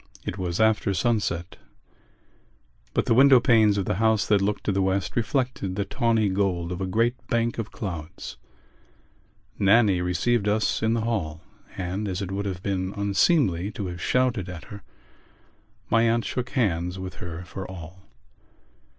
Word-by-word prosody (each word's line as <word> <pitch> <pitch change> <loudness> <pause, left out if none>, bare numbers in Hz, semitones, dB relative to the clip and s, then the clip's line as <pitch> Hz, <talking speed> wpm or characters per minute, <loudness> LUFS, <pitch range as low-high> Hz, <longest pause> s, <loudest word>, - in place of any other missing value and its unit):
It 95 - -4
was 90 0 -2
after 110 -2 +2
sunset; 95 -7 -1 1.4
but - - +2
the - - +3
window 135 +1 +7
panes 110 -5 +4
of 100 - 0
the - - -1
houses 110 -2 +2
that 105 -2 +4
looked 105 +1 -1
to - - 0
the 95 0 +1
west 95 0 0
reflected 120 -5 -1
the 100 - -1
tawny 115 -3 +1
gold 95 -3 0
of 90 +1 -4
a 95 - -1
great 115 +5 +2
bank 115 0 0
of 110 -2 -4
clouds. 85 -6 -6 1.2
Nannie 100 -2 +4
received 100 +5 +1
us 105 +1 +1
in 110 +1 +2
the 115 - 0
hall; 90 -8 -2 0.3
and, 95 +3 -3
as 95 -1 -3
it 95 -2 -4
would 100 +1 -2
have 90 -1 -5
been 95 -1 -2
unseemly 100 - +2
to 100 - -4
have 85 -1 -7
shouted 125 -7 +1
at 85 -3 -7
her, 100 - -9 1.1
my 115 - +3
aunt 115 0 +1
shook 125 -1 -3
hands 90 -6 0
with 95 0 -7
her 85 0 -6
for 95 +1 -7
all. 90 0 -10
100 Hz, 165 wpm, -25 LUFS, 90-115 Hz, 1.4 s, window